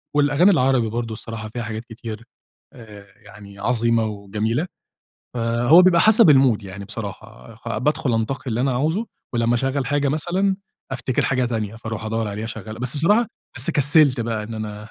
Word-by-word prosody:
والأغاني 145 +7 +4
العربي 130 - +2
برضو 115 0 -4
الصراحة 110 0 -7
فيها 120 +1 -5
حاجات 110 +1 -6
كتير 115 -1 -8 0.5
آآ، 105 -5 -13
يعني 100 -1 -15
عظيمة 115 -1 +1
وجميلة، 110 - -3 0.7
فهو 120 +8 +4
بيبقى 180 -2 +4
حسب 220 -4 +6
الmood 130 -6 +3
يعني 100 +1 -8
بصراحة، 110 +2 -9
خ 115 +2 -10
بادخل 135 -1 0
أنتقي 115 +3 -2
اللي 120 0 -2
أنا 135 0 +1
عاوزه، 160 - -1 0.3
ولمّا 120 0 +1
أشغّل 135 +1 -1
حاجة 145 +2 0
مثلًا 185 +6 0 0.3
أفتكر 130 -1 -2
حاجة 130 -2 0
تانية 110 -3 -3
فأروح 110 -1 -6
أدّور 110 0 -2
عليها 105 +2 -5
أشغّلها، 110 -1 -7
بس 125 +4 +3
بصراحة 210 +10 +3 0.3
بس 120 - +4
كسلت 145 -2 +5
بقى 110 -2 -3
إن 110 +2 -7
أنا 105 0 -7
115 Hz, 165 wpm, -21 LUFS, 110-140 Hz, 0.7 s, حسب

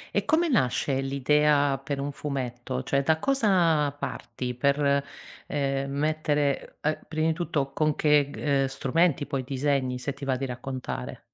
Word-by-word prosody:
E - - +1
come 335 +2 +3
nasce 135 - +1
l'idea 140 +1 +2
per 140 +1 -4
un 140 +1 -2
fumetto? 130 -3 -4
Cioè 140 +2 +1
da 160 +3 +2
cosa 175 - +2
parti 125 -3 -5
per, 140 +2 +2 0.4
ehm, 135 -1 -1
mettere 150 -1 0
uhm, 155 - +3
è - - -7
prima 155 0 0
di - - +2
tutto 150 -5 -2
con 155 -1 +1
che 150 -2 +3
g - - -9
ehm, 140 -2 +1
strumenti 145 +3 +1
poi 140 -2 -3
disegni, 135 -1 0
se 135 +2 -4
ti 140 - -12
va 135 -1 +1
di 135 - -3
raccontare? 120 - -5
140 Hz, 165 wpm, -27 LUFS, 135-150 Hz, 0.4 s, come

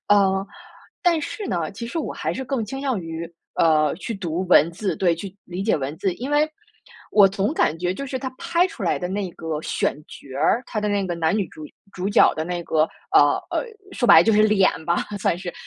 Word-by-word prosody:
嗯， 195 -1 +3 0.6
但 340 -3 +3
是 410 +6 -5
呢， 165 -3 -2
其 230 +4 -6
实 285 +8 -4
我 305 - -3
还 - - -3
是 265 - -4
更 250 -4 -2
倾 270 +6 -6
向 265 -6 -1
于， 165 0 -6 0.2
呃， 155 -2 +3
去 225 +4 -5
读 180 -1 -3
文 165 -1 +6
字 195 +3 -2
对， 175 -3 +2
去 190 +3 -8
理 185 +2 -5
解 215 - +2
文 140 +1 -4
字。 190 - 0
因 255 +8 -6
为， 295 +1 +3 0.6
我 205 -2 +7
总 200 +6 -1
感 160 - +1
觉 180 +1 -1
就 275 +7 -5
是 260 0 -3
它 260 -1 -4
拍 340 +1 +2
出 255 - -9
来 175 - +1
的 180 - -3
那 195 -1 -3
个 160 -2 -4
选 - - -1
角 130 -2 -11
儿， 165 - +2
它 215 - -3
的 210 - -1
那 200 -2 0
个 175 - -2
男 165 +3 +1
女 200 -4 0
主 155 - -11 0.3
主 185 +1 -3
角 205 - +5
的 155 - -3
那 175 0 -3
个， 155 -1 +2 0.3
呃， - - +6 0.2
呃， - - -1 0.3
说 245 - 0
白 - - +9
了 - - +7
就 225 - +3
是 210 +1 +5
脸 210 -3 +4 0.2
吧， 170 - +2 0.2
算 170 - +1
是。 180 -1 -6
195 Hz, 250 characters per minute, -23 LUFS, 170-230 Hz, 0.6 s, 白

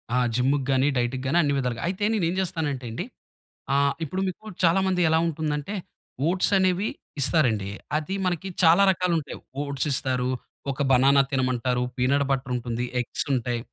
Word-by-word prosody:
ఆ! - - +3 0.2
జిమ్ముకి 135 +2 +1
గాని, 135 +1 +3
డైట్‌కి 125 +1 -1
గాని 160 +6 +2
అన్ని 145 -2 +1
విధాలుగా. 125 -3 -2
అయితే 190 +3 -2
నేనేం 175 -5 +1
జేస్తానంటే 155 -8 -2
అండి, - - -4 0.7
ఆహ్, 140 0 +3
ఇప్పుడు 185 +5 -3
మీకు 185 +4 -6 0.2
చాలా 170 +3 +5
మంది 180 -1 +1
ఎలా 160 0 +3
ఉంటుందంటే 150 +2 -3 0.6
ఓట్సనేవి 190 +1 +2 0.3
ఇస్తారండి. 115 - +2 0.3
అది 155 +6 -3
మనకి 185 +1 -1
చాలా 170 +5 +6
రకాలు 180 -1 0
ఉంటాయి 150 -2 -5 0.3
ఓట్స్ 140 +1 -2
ఇస్తారు, 130 -1 0 0.4
ఒక 135 - -4
బననా 135 +2 +5
తినమంటారు, 125 -1 0
పీనట్ 140 +3 +2
బటర్ 130 -2 -1
ఉంటుంది, 120 0 -2 0.2
ఎగ్స్ - - -3
ఉంటాయి. 120 -1 -1
140 Hz, 155 wpm, -25 LUFS, 125-175 Hz, 0.7 s, చాలా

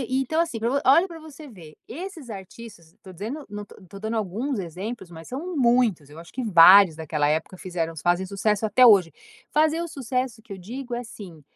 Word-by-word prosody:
e 260 +3 -1
e - - +2
então 315 +5 0
assim 330 -9 -2
pra 230 - 0
vo 280 +3 +1
olha 330 +8 +5
pra 335 -2 -10
você 310 -1 -12
ver, 170 - -14
esses 335 -3 -8
artistas, 190 -4 -11
eu - - -36
tô 190 - -12
dizendo, 235 - -7
não 205 0 -7
tô - - -17
tô 200 - -11
dando 220 +3 -4
alguns 220 +6 -3
exemplos, 190 +3 -6
mas 165 -1 -11
são 320 +7 -5
muitos, 235 - +2
eu 155 - -13
acho 170 - -13
que 255 - -4
vários 185 -3 +7
daquela 155 -2 -1
época 160 +4 -2
fizeram 165 -3 -4
fazem 175 +4 0
sucesso 210 +2 0
até 250 +4 +5
hoje. 195 -7 +6 0.4
Fazer 310 +2 +2
o 340 - -4
sucesso 255 -5 -4
que 215 - -12
eu 195 - -8
digo, 240 +7 -7
é 240 - -3
assim, 195 -9 -11
220 Hz, 225 wpm, -24 LUFS, 180-260 Hz, 0.4 s, vários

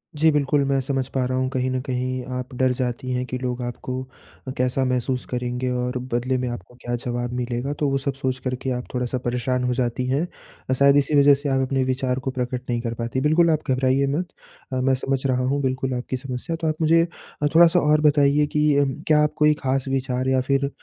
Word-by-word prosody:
जी 160 +2 +4
बिल्कुल, 145 0 +2
मैं 135 0 +1
समझ 135 -1 -2
पा 130 - +1
रहा 130 +1 -1
हूँ। 130 - +1
कहीं 130 -1 -1
न 130 - 0
कहीं, 130 -1 -2
आप 125 +1 -5
डर 130 0 +2
जाती 125 0 -3
हैं 125 0 -1
कि 125 - -3
लोग 125 -1 -3
आपको 125 +1 -4 0.5
कैसा 125 +1 +1
महसूस 125 0 -1
करेंगे 125 0 -2
और 125 0 -1 0.2
बदले 130 +2 +1
में 125 - -2
आपको 120 0 -8
क्या 120 0 -2
जवाब 120 0 -3
मिलेगा। 125 +2 -2
तो 145 - +1
वो 135 - +1
सब 135 0 -2
सोच 130 -1 -2
करके 130 +1 -3
आप 125 0 -2
थोड़ा-सा 125 0 -1
परेशान 125 +1 0
हो 125 0 +1
जाती 125 0 -1
हैं। 140 +6 +1 0.5
शायद 140 +2 +5
इसी 145 +1 +2
वजह 140 0 +7
से 140 +1 -4
आप 135 0 +2
अपने 135 0 +1
विचार 130 0 -1
को 130 0 -3
प्रकट 125 -1 -3
नहीं 120 -1 0
कर 115 -1 -3
पाती। 115 +3 -3
बिल्कुल 160 +4 +4
आप 155 - +2
घबराइए 130 +1 +2
मत। 180 +1 -2 0.5
अ, - - 0
मैं 135 +1 +3
समझ 135 +1 -2
रहा 130 -1 +1
हूँ 140 +3 0
बिल्कुल 130 0 -1
आपकी 125 +1 -3
समस्या। 130 +5 -4
तो 165 0 -3
आप 155 - +1
मुझे 165 +1 +4 0.4
अ, 145 - +3
थोड़ा-सा 170 +1 +7
और 150 -1 +3
बताइए 145 -1 +4
कि 150 -1 +3
उम, 140 -2 +1
क्या 155 -1 +5
आप 150 - 0
कोई 150 0 +5
खास 135 0 0
विचार 130 -1 -1
या 130 -1 +3
फिर 140 0 +2
130 Hz, 225 wpm, -23 LUFS, 125-140 Hz, 0.5 s, वजह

